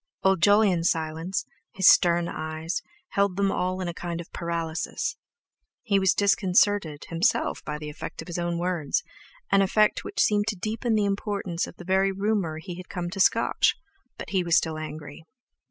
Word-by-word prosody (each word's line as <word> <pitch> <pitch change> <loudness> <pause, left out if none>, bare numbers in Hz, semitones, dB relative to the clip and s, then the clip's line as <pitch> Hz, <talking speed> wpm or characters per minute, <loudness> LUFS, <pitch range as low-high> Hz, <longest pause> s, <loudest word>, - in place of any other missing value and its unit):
Old 190 -2 +3
Jolyon's 200 -3 +4
silence, 160 +3 -2 0.3
his 190 -1 +4
stern 170 -1 +5
eyes, 155 +1 -4 0.3
held 200 -2 +1
them 200 -1 +2
all 185 +1 -1
in 180 - -3
a 175 - -3
kind 170 0 -5
of 170 - -9
paralysis. 170 -1 -3 0.7
He 200 -5 +2
was 190 -2 +3
disconcerted 195 -5 +2
himself 165 +5 0
by 150 - -4
the 150 0 -7
effect 150 - -8
of - - -17
his 175 0 -4
own 175 0 -1
words—an 180 - -2
effect 210 +2 +2
which 420 - -6
seemed 205 0 +2
to 225 - 0
deepen 220 +4 -1
the 210 -1 +2
importance 200 -3 -2
of - - -11
the 175 - -11
very 190 +1 +2
rumour 195 -5 -1
he 175 +2 -7
had 185 - -10
come 175 -1 -4
to 195 - -6
scotch; 190 - +3 0.4
but - - -8
he 190 -2 +1
was 170 -1 +3
still 160 -1 0
angry. 155 -1 -8
180 Hz, 175 wpm, -26 LUFS, 165-200 Hz, 0.7 s, stern